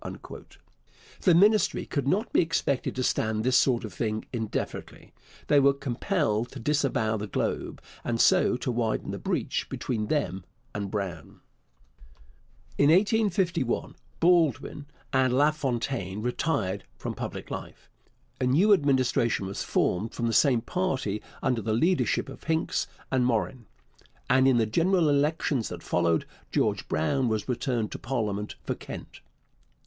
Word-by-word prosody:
The 180 Hz, -4 st, +5 dB
Ministry 205 Hz, +2 st, +4 dB
could 140 Hz, -4 st, -2 dB
not 205 Hz, +10 st, 0 dB
be -, -, +5 dB
expected 160 Hz, -5 st, -1 dB
to 130 Hz, -, -1 dB
stand 110 Hz, -2 st, 0 dB
this 130 Hz, +1 st, +2 dB
sort 125 Hz, -3 st, +3 dB
of 105 Hz, -, -8 dB
thing 110 Hz, +3 st, -2 dB
indefinitely. 110 Hz, -3 st, -5 dB, 0.3 s
They 145 Hz, -, +4 dB
were 140 Hz, 0 st, +4 dB
compelled 130 Hz, -, -1 dB
to 135 Hz, -, -7 dB
disavow 125 Hz, -5 st, +1 dB
the 105 Hz, 0 st, -4 dB
Globe, -, -, -2 dB, 0.2 s
and 115 Hz, -1 st, -1 dB
so 120 Hz, -, +4 dB
to 125 Hz, -, -2 dB
widen 115 Hz, -2 st, -1 dB
the -, -, -5 dB
breach -, -, -2 dB
between 110 Hz, -4 st, -3 dB
them 95 Hz, -, -1 dB, 0.3 s
and 100 Hz, -2 st, -3 dB
Brown. 95 Hz, -7 st, -5 dB, 1.4 s
In 145 Hz, -, +5 dB
1851 190 Hz, -, +2 dB, 0.3 s
Baldwin 160 Hz, -4 st, +2 dB, 0.3 s
and 130 Hz, -1 st, +3 dB
LaFontaine 130 Hz, -8 st, 0 dB
retired 110 Hz, -7 st, -1 dB
from -, -, -4 dB
public -, -, -6 dB
life. -, -, -7 dB, 0.5 s
A 130 Hz, -, +1 dB
new 180 Hz, +12 st, +5 dB
Administration 130 Hz, -, +2 dB
was 95 Hz, +1 st, -4 dB
formed 105 Hz, +6 st, 0 dB
from 120 Hz, -, -2 dB
the 115 Hz, -, 0 dB
same 125 Hz, -4 st, +4 dB
party 130 Hz, -, -2 dB, 0.2 s
under 125 Hz, -3 st, +1 dB
the 110 Hz, +1 st, -1 dB
leadership 170 Hz, +10 st, +1 dB
of 135 Hz, -, -11 dB
Hincks 160 Hz, +1 st, 0 dB, 0.2 s
and 130 Hz, -2 st, +2 dB
Morin, 120 Hz, 0 st, -1 dB, 0.6 s
and 130 Hz, 0 st, +4 dB
in 130 Hz, -2 st, +4 dB
the 115 Hz, -, +3 dB
general 165 Hz, -, +2 dB
elections 145 Hz, -3 st, +1 dB
that 90 Hz, -1 st, -8 dB
followed 85 Hz, -2 st, +1 dB, 0.3 s
George -, -, 0 dB
Brown 125 Hz, -, +1 dB
was 110 Hz, -2 st, -1 dB
returned 120 Hz, -3 st, -1 dB
to -, -, -6 dB
parliament 105 Hz, -5 st, -3 dB
for -, -, -2 dB
Kent. -, -, -9 dB
125 Hz, 140 wpm, -27 LUFS, 110-150 Hz, 1.4 s, The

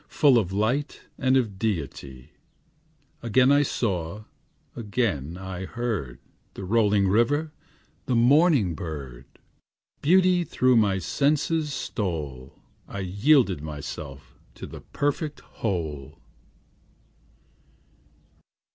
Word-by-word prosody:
Full 135 Hz, -5 st, +4 dB
of 95 Hz, -4 st, -2 dB
light 120 Hz, +9 st, -1 dB, 0.2 s
and 130 Hz, 0 st, +3 dB
of 105 Hz, -7 st, -1 dB
deity; 75 Hz, -, -4 dB, 0.9 s
Again 125 Hz, +3 st, +3 dB
I 145 Hz, 0 st, +5 dB
saw, 100 Hz, -, -2 dB, 0.5 s
again 100 Hz, -, -2 dB
I 95 Hz, 0 st, -6 dB
heard, 105 Hz, -, -3 dB, 0.4 s
The -, -, -7 dB
rolling 105 Hz, -1 st, +2 dB
river, 145 Hz, +10 st, +2 dB, 0.6 s
the 130 Hz, -, +1 dB
morning 130 Hz, -, +4 dB
bird; 70 Hz, -8 st, -7 dB, 0.8 s
Beauty 180 Hz, +2 st, +4 dB
through 130 Hz, -6 st, +2 dB
my 100 Hz, -3 st, +3 dB
senses 150 Hz, -, 0 dB
stole; 75 Hz, -, -4 dB, 0.3 s
I 100 Hz, -, -6 dB
yielded 100 Hz, -, +3 dB
myself 75 Hz, -2 st, -8 dB, 0.2 s
to -, -, -8 dB
the -, -, -10 dB
perfect 145 Hz, +1 st, -3 dB
whole. 80 Hz, -, -4 dB
105 Hz, 95 wpm, -25 LUFS, 85-135 Hz, 0.9 s, I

